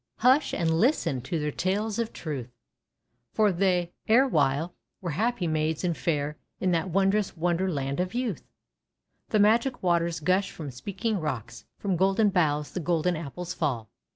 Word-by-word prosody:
hush 260 Hz, +5 st, +4 dB
and 160 Hz, -1 st, +1 dB
listen 170 Hz, -, +2 dB
to 145 Hz, +7 st, -3 dB
their 150 Hz, -1 st, -1 dB
tales 205 Hz, +7 st, -1 dB
of 230 Hz, -1 st, -1 dB
truth, 140 Hz, -7 st, -5 dB, 0.8 s
For 215 Hz, -2 st, +4 dB
they, 180 Hz, -1 st, +1 dB
erewhile, 170 Hz, -, +3 dB, 0.3 s
were 175 Hz, -3 st, -3 dB
happy 215 Hz, +4 st, 0 dB
Maids 155 Hz, 0 st, 0 dB
and 175 Hz, -2 st, +1 dB
fair, 150 Hz, -2 st, -1 dB, 0.2 s
In 185 Hz, -, +1 dB
that 170 Hz, +1 st, 0 dB
wondrous 195 Hz, +2 st, +1 dB
Wonder 175 Hz, +3 st, +1 dB
Land 140 Hz, -1 st, -2 dB
of 180 Hz, +4 st, -2 dB
Youth 240 Hz, -, -2 dB, 0.4 s
/" -, -, -50 dB
The -, -, +2 dB
Magic 230 Hz, +5 st, +3 dB
Waters 170 Hz, -2 st, +1 dB
gush 185 Hz, +5 st, +1 dB
from 150 Hz, -4 st, -7 dB
Speaking 200 Hz, -, -3 dB
Rocks, 120 Hz, -7 st, -5 dB
From 195 Hz, -3 st, -1 dB
Golden 195 Hz, +4 st, +3 dB
Boughs 150 Hz, -5 st, +1 dB
the -, -, -3 dB
Golden 175 Hz, +1 st, +1 dB
Apples 170 Hz, +3 st, -5 dB
fall9 140 Hz, -10 st, -1 dB
A. -, -, -28 dB
175 Hz, 165 wpm, -27 LUFS, 155-200 Hz, 0.8 s, hush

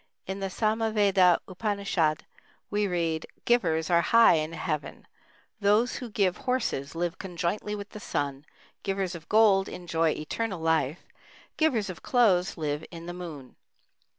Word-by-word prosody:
In 190 Hz, +1 st, -4 dB
the 195 Hz, -1 st, -2 dB
Samaveda 210 Hz, -4 st, +3 dB
Upanishad 195 Hz, -6 st, -1 dB, 0.5 s
we 205 Hz, 0 st, +1 dB
read: 165 Hz, -3 st, -1 dB, 0.2 s
"Givers 165 Hz, -10 st, +2 dB
are 170 Hz, 0 st, +5 dB
high 230 Hz, +6 st, +6 dB
in 155 Hz, 0 st, -1 dB
Heaven. 155 Hz, -2 st, -4 dB, 0.5 s
Those 210 Hz, +4 st, +2 dB
who 250 Hz, -3 st, -6 dB
give 195 Hz, -4 st, +1 dB
horses 220 Hz, -, -2 dB
live 175 Hz, +1 st, -2 dB
conjointly 190 Hz, +3 st, -3 dB
with 200 Hz, 0 st, -7 dB
the 210 Hz, -, -9 dB
sun; 145 Hz, -6 st, -3 dB, 0.4 s
givers 195 Hz, -2 st, -2 dB
of 165 Hz, -2 st, -10 dB
gold 205 Hz, -3 st, +4 dB
enjoy 165 Hz, -2 st, 0 dB
eternal 190 Hz, +5 st, -3 dB
life; 160 Hz, -2 st, 0 dB, 0.5 s
givers 260 Hz, -10 st, +1 dB
of 185 Hz, -3 st, -7 dB
clothes 195 Hz, -9 st, +2 dB
live 150 Hz, -1 st, -2 dB
in 165 Hz, -1 st, -9 dB
the 175 Hz, -, -5 dB
moon." 160 Hz, -8 st, -9 dB
180 Hz, 140 wpm, -27 LUFS, 165-210 Hz, 0.5 s, high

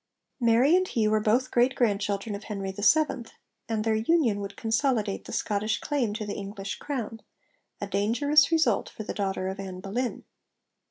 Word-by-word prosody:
Mary 240 Hz, +6 st, +4 dB
and 370 Hz, 0 st, +2 dB
he 225 Hz, -9 st, +1 dB
were 215 Hz, 0 st, +3 dB
both 235 Hz, +5 st, +1 dB
great 245 Hz, +2 st, +3 dB
grandchildren 205 Hz, -2 st, 0 dB
of 200 Hz, +1 st, -7 dB
Henry 195 Hz, -2 st, -4 dB
VII., 240 Hz, +6 st, +2 dB, 0.4 s
and 220 Hz, -1 st, 0 dB
their 225 Hz, 0 st, +1 dB
union 225 Hz, -1 st, +2 dB
would 200 Hz, 0 st, -6 dB
consolidate 225 Hz, -2 st, 0 dB
the -, -, -8 dB
Scottish 210 Hz, +1 st, -1 dB
claim 265 Hz, -7 st, -1 dB
to 215 Hz, -1 st, -4 dB
the 205 Hz, -, -4 dB
English 200 Hz, 0 st, -5 dB
crown 235 Hz, -6 st, -4 dB, 0.6 s
a -, -, -3 dB
dangerous 245 Hz, -, +3 dB
result 315 Hz, -10 st, +2 dB
for 215 Hz, -, -8 dB
the -, -, -5 dB
daughter 190 Hz, -2 st, -2 dB
of 190 Hz, +1 st, -4 dB
Ann 190 Hz, -2 st, -6 dB
Boleyn. 230 Hz, +6 st, -3 dB
220 Hz, 170 wpm, -27 LUFS, 200-250 Hz, 0.6 s, Mary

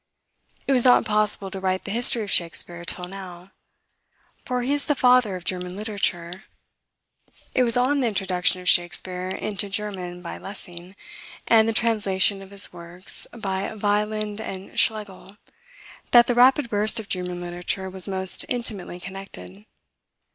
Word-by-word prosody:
It -, -, 0 dB
was 255 Hz, -3 st, +5 dB
not 250 Hz, -, +6 dB
possible 210 Hz, -2 st, +2 dB
to 195 Hz, -, -5 dB
write 185 Hz, 0 st, -1 dB
the 200 Hz, -, -5 dB
history 235 Hz, +1 st, +4 dB
of 200 Hz, -, -5 dB
Shakspeare 170 Hz, 0 st, +1 dB
till 180 Hz, +1 st, -4 dB
now; 185 Hz, -1 st, -10 dB, 0.9 s
for 250 Hz, -1 st, -1 dB
he 270 Hz, +3 st, 0 dB
is 290 Hz, -1 st, -2 dB
the 295 Hz, -, +2 dB
father 250 Hz, -6 st, +4 dB
of 180 Hz, -, -7 dB
German 180 Hz, 0 st, -3 dB
literature: 190 Hz, -3 st, -3 dB, 1.1 s
it -, -, +3 dB
was 240 Hz, -1 st, +3 dB
on 270 Hz, +4 st, +2 dB
the 255 Hz, -, +1 dB
introduction 185 Hz, -3 st, 0 dB
of 180 Hz, -, -9 dB
Shakspeare 180 Hz, +1 st, +2 dB
into 200 Hz, +1 st, -3 dB
German 185 Hz, -3 st, -4 dB
by 170 Hz, -, -7 dB
Lessing, 180 Hz, -1 st, -9 dB, 0.5 s
and 225 Hz, -1 st, +5 dB
the -, -, +2 dB
translation 205 Hz, -4 st, +2 dB
of 195 Hz, -, -12 dB
his 200 Hz, -2 st, +3 dB
works 175 Hz, +2 st, -3 dB
by 195 Hz, -4 st, -3 dB
Wieland 210 Hz, 0 st, -1 dB
and 190 Hz, -2 st, -5 dB
Schlegel, 205 Hz, -2 st, -1 dB, 0.7 s
that 240 Hz, -1 st, +7 dB
the 245 Hz, -, +1 dB
rapid 255 Hz, +2 st, +5 dB
burst 215 Hz, +2 st, +1 dB
of 215 Hz, -, -8 dB
German 180 Hz, -1 st, -3 dB
literature 175 Hz, +2 st, -3 dB
was 185 Hz, -1 st, -5 dB
most 190 Hz, -1 st, -2 dB
intimately 215 Hz, -7 st, -4 dB
connected. 140 Hz, -, -9 dB
195 Hz, 155 wpm, -24 LUFS, 180-220 Hz, 1.1 s, that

